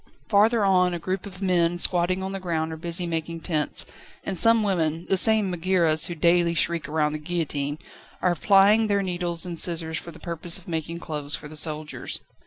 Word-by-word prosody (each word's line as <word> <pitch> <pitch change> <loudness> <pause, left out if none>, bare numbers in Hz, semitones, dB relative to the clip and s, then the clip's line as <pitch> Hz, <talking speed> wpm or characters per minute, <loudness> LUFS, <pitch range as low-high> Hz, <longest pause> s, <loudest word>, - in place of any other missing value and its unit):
Farther 215 +1 +3
on, 180 -2 +3
a - - -2
group 185 +3 -4
of 190 - -11
older 195 +2 -5
men, 175 -2 +2
squatting 180 +1 +1
on 190 - -3
the 195 - -4
ground, 160 -3 -2
are - - -5
busy 170 +2 0
making 165 0 -4
tents, 155 -4 0 0.4
and 195 - -4
some 225 +5 +4
women 165 -4 -1
the 195 - +3
same 215 0 +3
Megaeras 170 -3 +2
who 175 - -5
daily 170 +1 +2
shriek 170 -3 -1
round 150 0 0
the 155 - -4
guillotine 150 -3 -3 0.4
are 180 - +1
plying 205 +5 +4
their 200 -1 +1
needles 175 -2 -2
and 170 -2 -4
scissors 160 -2 0
for - - -11
the 160 - -12
purpose 170 +1 -1
of 185 - -16
making 165 0 -4
clothes 150 -4 -3
for - - -8
the 155 - -11
soldiers. 155 0 -3
170 Hz, 200 wpm, -24 LUFS, 160-185 Hz, 0.4 s, some